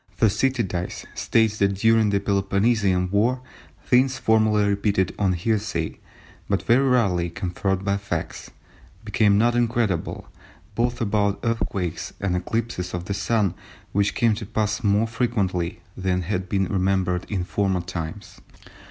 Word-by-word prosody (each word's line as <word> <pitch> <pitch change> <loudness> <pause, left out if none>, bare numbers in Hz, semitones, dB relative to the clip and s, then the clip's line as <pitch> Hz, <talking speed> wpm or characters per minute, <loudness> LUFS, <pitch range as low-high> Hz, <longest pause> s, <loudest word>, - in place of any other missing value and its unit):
Thucydides 110 -5 0
states 110 -2 +1
that 100 0 +2
during 110 +1 +3
the 100 -1 +2
Peloponnesian 100 -1 +1
war 120 +6 +1 0.4
"things 130 +1 +3
formerly 110 -3 +3
repeated 100 -2 +1
on 95 -3 +2
hearsay, 95 -3 -2 0.5
but 100 -1 0
very 130 +4 +3
rarely 95 -9 +2
confirmed 95 +2 -2
by 100 0 +1
facts, 100 - -5 0.6
became 105 -1 +3
not 120 +3 +3
incredible, 115 -7 0 0.5
both 120 +1 -1
about 100 -2 +1
earthquakes 95 -7 -2
and 95 -2 -1
eclipses 90 -1 -2
of 90 0 -5
the 100 - -2
Sun 100 -1 +1 0.4
which 100 0 +1
came 115 -2 +3
to 105 0 -5
pass 105 +2 -1
more 105 +1 +3
frequently 105 -7 -1
than 90 -1 -1
had 95 0 -3
been 95 -1 +1
remembered 95 -1 0
in 95 -4 -1
former 95 +1 0
times." 85 -3 -7
100 Hz, 135 wpm, -24 LUFS, 95-115 Hz, 0.6 s, during